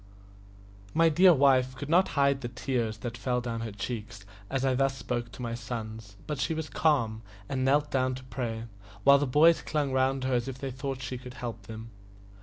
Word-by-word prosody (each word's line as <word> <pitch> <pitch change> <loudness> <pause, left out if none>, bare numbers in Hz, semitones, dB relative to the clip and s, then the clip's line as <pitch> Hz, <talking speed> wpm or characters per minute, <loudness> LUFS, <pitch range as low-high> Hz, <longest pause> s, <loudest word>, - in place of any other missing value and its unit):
My 165 0 +5
dear 180 +4 +6
wife 130 -3 +4
could 140 +2 -6
not 175 +5 +4
hide 140 -1 +3
the 120 - -3
tears 120 -3 -2
that 115 -1 -3
fell 125 0 0
down 115 -2 -4
her 115 -1 -4
cheeks 105 -1 -6 0.2
as 135 0 -1
I 130 - +3
thus 135 +1 +1
spoke 120 -3 -3
to 125 - -7
my 115 -1 -3
sons, 110 -3 -6
but 150 -3 -4
she 160 +4 0
was 160 -1 -4
calm, 120 -9 +1 0.3
and 130 -1 -1
knelt 145 +3 +2
down 130 -1 +1
to 130 - -9
pray, 120 -3 -4 0.4
while 140 0 +7
the 145 - 0
boys 160 +6 +5
clung 145 -3 -1
round 130 0 +1
her 130 0 0
as 120 0 0
if 135 -1 -5
they 135 0 -4
thought 130 0 -5
she 125 0 -4
could 125 0 -10
help 115 -4 -6
them. 110 0 -8
130 Hz, 210 wpm, -29 LUFS, 120-140 Hz, 0.4 s, while